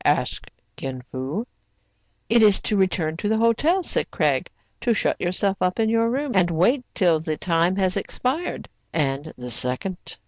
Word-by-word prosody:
asked -, -, 0 dB, 0.3 s
Kin 130 Hz, -2 st, -5 dB
Fo. 135 Hz, -, -3 dB, 0.8 s
"It 235 Hz, 0 st, +4 dB
is 210 Hz, -3 st, +6 dB
to 215 Hz, -, -1 dB
return 175 Hz, -5 st, +1 dB
to 205 Hz, -, -2 dB
the 220 Hz, -, +2 dB
hotel,'* 285 Hz, -, +2 dB
said -, -, -1 dB
Craig, -, -, 0 dB, 0.3 s
"to 235 Hz, -2 st, +1 dB
shut -, -, 0 dB
yourself 190 Hz, +2 st, 0 dB
up 185 Hz, +4 st, 0 dB
in 220 Hz, -1 st, +2 dB
your 230 Hz, 0 st, +2 dB
room, 275 Hz, +3 st, -1 dB
and 180 Hz, -2 st, +3 dB
wait 190 Hz, -, +2 dB
till 175 Hz, -6 st, +3 dB
the 155 Hz, -1 st, -3 dB
time 170 Hz, +2 st, +1 dB
has 190 Hz, -2 st, +1 dB
expired. 260 Hz, -, -2 dB, 0.2 s
"And 145 Hz, 0 st, -1 dB
the 125 Hz, 0 st, -6 dB
second? 130 Hz, +11 st, -2 dB
185 Hz, 170 wpm, -23 LUFS, 160-230 Hz, 0.8 s, is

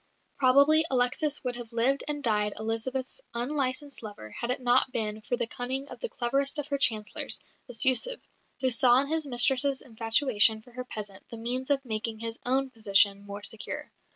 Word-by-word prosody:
Probably 280 Hz, +4 st, +6 dB
Alexis 265 Hz, +4 st, +1 dB
would 250 Hz, -1 st, -2 dB
have 240 Hz, -1 st, -7 dB
lived 245 Hz, +4 st, +2 dB
and 295 Hz, -1 st, -1 dB
died 210 Hz, -3 st, +1 dB
Elizabeth's 240 Hz, -, -3 dB
unlicensed 270 Hz, +2 st, -1 dB
lover 205 Hz, -, -9 dB
had 235 Hz, -, -5 dB
it 250 Hz, -, 0 dB
not 250 Hz, +1 st, +2 dB
been 215 Hz, -2 st, -3 dB
for 245 Hz, +3 st, -2 dB
the 240 Hz, -, -1 dB
cunning 260 Hz, +4 st, -4 dB
of -, -, -10 dB
the 480 Hz, -, -4 dB
cleverest 275 Hz, -, 0 dB
of 295 Hz, 0 st, -3 dB
her 280 Hz, -1 st, -1 dB
Chancellors, 215 Hz, -5 st, -1 dB, 0.3 s
Bestyouzhev, 260 Hz, -, 0 dB, 0.4 s
who 260 Hz, -1 st, +2 dB
saw 245 Hz, +1 st, +5 dB
in 280 Hz, -, -4 dB
his 315 Hz, -1 st, 0 dB
mistress's 265 Hz, +2 st, +4 dB
infatuation 225 Hz, -2 st, +2 dB
for 245 Hz, -, -18 dB
her 250 Hz, +1 st, -7 dB
peasant 205 Hz, -5 st, -8 dB
the 230 Hz, -, -8 dB
means 250 Hz, +4 st, -3 dB
of 275 Hz, -1 st, +1 dB
making 220 Hz, -1 st, -3 dB
his 230 Hz, +1 st, -5 dB
own 265 Hz, +1 st, +1 dB
position 200 Hz, -3 st, +2 dB
more 200 Hz, +1 st, -7 dB
secure. 220 Hz, -, -5 dB
245 Hz, 180 wpm, -28 LUFS, 225-270 Hz, 0.4 s, Probably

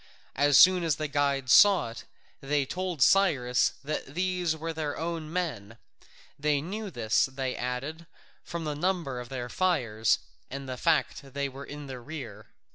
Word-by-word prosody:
As 145 Hz, 0 st, +4 dB
soon 185 Hz, -1 st, +7 dB
as 160 Hz, -4 st, +1 dB
the 155 Hz, +3 st, -3 dB
guides 140 Hz, -2 st, +1 dB
saw 195 Hz, -, +6 dB
it, 115 Hz, -, -10 dB, 0.3 s
they 140 Hz, 0 st, 0 dB
told 180 Hz, -2 st, -1 dB
Cyrus 140 Hz, -11 st, +3 dB
that 145 Hz, -1 st, -5 dB
these 180 Hz, -3 st, 0 dB
were 165 Hz, +1 st, -4 dB
their 155 Hz, -2 st, -3 dB
own 165 Hz, -2 st, -4 dB
men: 120 Hz, -, -3 dB, 0.6 s
they 145 Hz, 0 st, +2 dB
knew 200 Hz, +8 st, -5 dB
this, 115 Hz, -, +1 dB
they 130 Hz, -1 st, -4 dB
added, 140 Hz, +7 st, -4 dB, 0.4 s
from 170 Hz, -1 st, -5 dB
the 150 Hz, -1 st, -2 dB
number 160 Hz, -5 st, -1 dB
of 120 Hz, -1 st, -8 dB
their 125 Hz, -2 st, -4 dB
fires, 120 Hz, -, +1 dB, 0.3 s
and 140 Hz, 0 st, -6 dB
the 130 Hz, -, -4 dB
fact 125 Hz, -, +1 dB
that 135 Hz, -1 st, -17 dB
they 140 Hz, 0 st, 0 dB
were 135 Hz, +1 st, -9 dB
in 145 Hz, 0 st, -8 dB
the 130 Hz, -2 st, -7 dB
rear. 120 Hz, -6 st, -8 dB
145 Hz, 170 wpm, -28 LUFS, 130-165 Hz, 0.6 s, soon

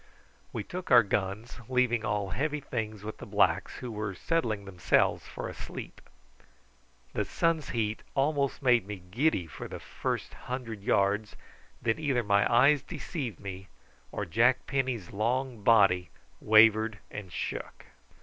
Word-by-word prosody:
We -, -, -3 dB
took 180 Hz, 0 st, -7 dB
our 120 Hz, -3 st, +8 dB
guns, 100 Hz, +4 st, -2 dB
leaving 125 Hz, -3 st, +2 dB
all 105 Hz, -3 st, -1 dB
heavy 150 Hz, -, -1 dB
things 110 Hz, -6 st, -4 dB
with 110 Hz, 0 st, -7 dB
the -, -, -7 dB
blacks, -, -, +2 dB
who 125 Hz, -2 st, -6 dB
were 105 Hz, -2 st, -4 dB
settling 115 Hz, -, -1 dB
themselves 90 Hz, -2 st, +1 dB
for -, -, -6 dB
a -, -, -6 dB
sleep. -, -, -8 dB, 1.1 s
The -, -, 0 dB
sun's 165 Hz, -4 st, 0 dB
heat 110 Hz, -2 st, -1 dB
almost 140 Hz, -3 st, +1 dB
made 120 Hz, -6 st, +4 dB
me 105 Hz, -, -4 dB, 0.2 s
giddy 125 Hz, -, +1 dB
for 80 Hz, -, -8 dB
the -, -, -7 dB
first -, -, -4 dB
hundred 120 Hz, -4 st, -6 dB
yards, 100 Hz, +2 st, +1 dB, 0.5 s
and 115 Hz, +3 st, +1 dB
either 135 Hz, -6 st, +1 dB
my 100 Hz, 0 st, +3 dB
eyes 135 Hz, +4 st, +5 dB
deceived 130 Hz, -, -5 dB
me 95 Hz, -1 st, -7 dB, 0.4 s
or 105 Hz, -, -3 dB
Jack 115 Hz, +8 st, +3 dB
Penny's 130 Hz, -8 st, -2 dB
long 120 Hz, +3 st, -1 dB
body 100 Hz, -5 st, +4 dB, 0.3 s
wavered 110 Hz, 0 st, +5 dB
and 100 Hz, -3 st, -7 dB
shook. -, -, -5 dB
115 Hz, 145 wpm, -29 LUFS, 100-130 Hz, 1.1 s, our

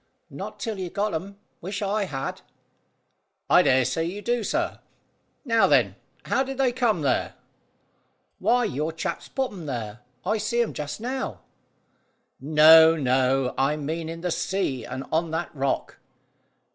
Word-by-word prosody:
"Not -, -, -7 dB
till 220 Hz, -4 st, -4 dB
you 185 Hz, -2 st, -3 dB
got 205 Hz, +3 st, -1 dB
'em. 195 Hz, +5 st, -5 dB, 0.2 s
Wish 195 Hz, +4 st, -4 dB
I 200 Hz, +1 st, 0 dB
had!" 135 Hz, -7 st, -5 dB, 1.1 s
"I -, -, +8 dB
dare 130 Hz, -1 st, +3 dB
say 165 Hz, +6 st, -1 dB
you 190 Hz, +5 st, -5 dB
do, 240 Hz, -1 st, 0 dB
sir. -, -, -1 dB, 0.7 s
Now, 230 Hz, -3 st, +4 dB
then: -, -, +3 dB, 0.3 s
how -, -, +1 dB
did 270 Hz, 0 st, -3 dB
they 265 Hz, -2 st, +2 dB
come 235 Hz, -8 st, +1 dB
there?" 140 Hz, -, 0 dB, 1.0 s
"Why, 245 Hz, +1 st, +3 dB
your 155 Hz, -5 st, -2 dB
chaps 160 Hz, -, -4 dB
put 265 Hz, -1 st, -2 dB
'em 175 Hz, -6 st, -8 dB
there. 115 Hz, -4 st, -5 dB, 0.3 s
I 220 Hz, -, +1 dB
see 225 Hz, +3 st, -1 dB
'em 230 Hz, -, -5 dB
just 150 Hz, +4 st, -5 dB
now." 260 Hz, +3 st, -4 dB, 1.0 s
"No, 160 Hz, +2 st, +7 dB
no; 130 Hz, -2 st, +1 dB
I 135 Hz, +3 st, +2 dB
mean 160 Hz, +2 st, -4 dB
in 165 Hz, 0 st, -6 dB
the 180 Hz, 0 st, -1 dB
sea 160 Hz, -10 st, -1 dB
and 130 Hz, +2 st, -5 dB
on 165 Hz, +1 st, +1 dB
that 165 Hz, +2 st, -3 dB
rock." 140 Hz, -2 st, -2 dB
165 Hz, 155 wpm, -25 LUFS, 145-215 Hz, 1.1 s, I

